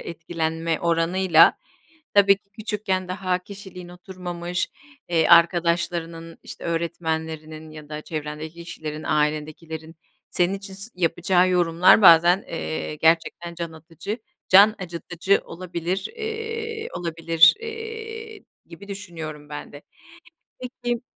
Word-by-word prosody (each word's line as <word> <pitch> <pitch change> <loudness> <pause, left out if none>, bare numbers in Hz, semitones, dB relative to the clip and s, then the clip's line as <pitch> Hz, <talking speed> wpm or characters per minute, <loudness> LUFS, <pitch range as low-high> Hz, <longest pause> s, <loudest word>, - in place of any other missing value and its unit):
etkilenme 165 0 -3
oranıyla, 170 +1 +4 0.6
tabii 200 -1 +6
ki 200 0 -36
küçükken 205 -3 -3
daha 185 -1 -1
kişiliğin 185 -1 -11
oturmamış, 180 -1 -5 0.4
eee, 165 -2 +2
arkadaşlarının, 170 -1 +2
işte, - - -10
öğretmenlerinin 160 -2 -3
ya 155 -1 -11
da 150 0 -5
çevrendeki 155 +2 -6
kişilerin, 155 -2 -6
ailendekilerin, 155 +2 -2 0.3
senin 180 +2 +3
için 195 0 -8
s 200 +4 -3
yapacağı 180 +1 +2
yorumlar 175 +3 +5
bazen, 175 +2 +7
eee, 160 -1 -4
gerçekten 165 +2 +1
can 170 -1 -5
atıcı 165 +7 -7 0.3
can 205 +3 +7
acıtıcı 175 +1 -1
olabilir 180 +2 -4
eee, 450 0 -4
olabilir, 165 -1 +4
eee, 450 -1 -7 0.2
gibi 185 +4 -13
düşünüyorum 160 -7 -7
ben 150 - -8
de. 145 0 -11 0.8
Peki 245 -1 -4
175 Hz, 110 wpm, -23 LUFS, 165-195 Hz, 0.8 s, bazen